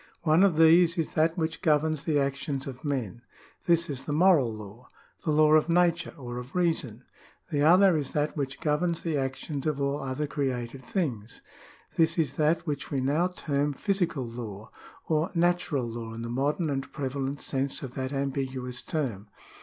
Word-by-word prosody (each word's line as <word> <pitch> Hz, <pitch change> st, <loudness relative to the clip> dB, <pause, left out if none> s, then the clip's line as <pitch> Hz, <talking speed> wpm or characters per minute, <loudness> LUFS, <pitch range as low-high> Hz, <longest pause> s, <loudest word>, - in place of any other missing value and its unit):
One 160 Hz, +1 st, +4 dB
of 190 Hz, -5 st, +4 dB
these 165 Hz, +2 st, +6 dB
is 165 Hz, -, -1 dB
that 160 Hz, +2 st, +1 dB
which 160 Hz, -1 st, -2 dB
governs 155 Hz, -1 st, +1 dB
the 155 Hz, -3 st, +2 dB
actions 140 Hz, 0 st, -1 dB
of 135 Hz, 0 st, -8 dB
men: 125 Hz, -6 st, -3 dB, 0.5 s
this 170 Hz, -1 st, +3 dB
is 135 Hz, -3 st, -5 dB
the -, -, -3 dB
moral 155 Hz, -6 st, +4 dB
law, 110 Hz, +3 st, -10 dB, 0.4 s
the -, -, -2 dB
law 155 Hz, 0 st, +5 dB
of 155 Hz, +2 st, +4 dB
nature, 170 Hz, 0 st, +2 dB
or 120 Hz, -3 st, -6 dB
of 125 Hz, +6 st, -10 dB
reason. 160 Hz, -10 st, 0 dB, 0.5 s
The 145 Hz, -2 st, +1 dB
other 180 Hz, +4 st, +6 dB
is 145 Hz, -3 st, -2 dB
that 150 Hz, 0 st, 0 dB
which 135 Hz, -3 st, -3 dB
governs 165 Hz, +3 st, 0 dB
the 165 Hz, -3 st, -1 dB
actions 135 Hz, +2 st, -3 dB
of 150 Hz, -2 st, -1 dB
all 140 Hz, +1 st, -1 dB
other 135 Hz, +2 st, -2 dB
created 130 Hz, -3 st, -3 dB
things: 125 Hz, -, -3 dB, 0.5 s
this 165 Hz, +1 st, +3 dB
is 150 Hz, -5 st, +1 dB
that 155 Hz, +2 st, +2 dB
which 145 Hz, -4 st, -3 dB
we 140 Hz, -, -1 dB
now 145 Hz, +7 st, +2 dB
term 145 Hz, -5 st, -1 dB
physical 175 Hz, -, -1 dB
law, 110 Hz, -2 st, -8 dB, 0.4 s
or 160 Hz, +2 st, +1 dB
natural 170 Hz, -7 st, +1 dB
law 115 Hz, -1 st, -6 dB
in 115 Hz, -, -6 dB
the 115 Hz, -, -5 dB
modern 145 Hz, +6 st, 0 dB
and 135 Hz, -1 st, -3 dB
prevalent 140 Hz, 0 st, -3 dB
sense 135 Hz, 0 st, -1 dB
of 130 Hz, -2 st, -6 dB
that 130 Hz, -1 st, -3 dB
ambiguous 135 Hz, -2 st, -3 dB
term. 115 Hz, -10 st, -3 dB
145 Hz, 175 wpm, -28 LUFS, 130-160 Hz, 0.5 s, these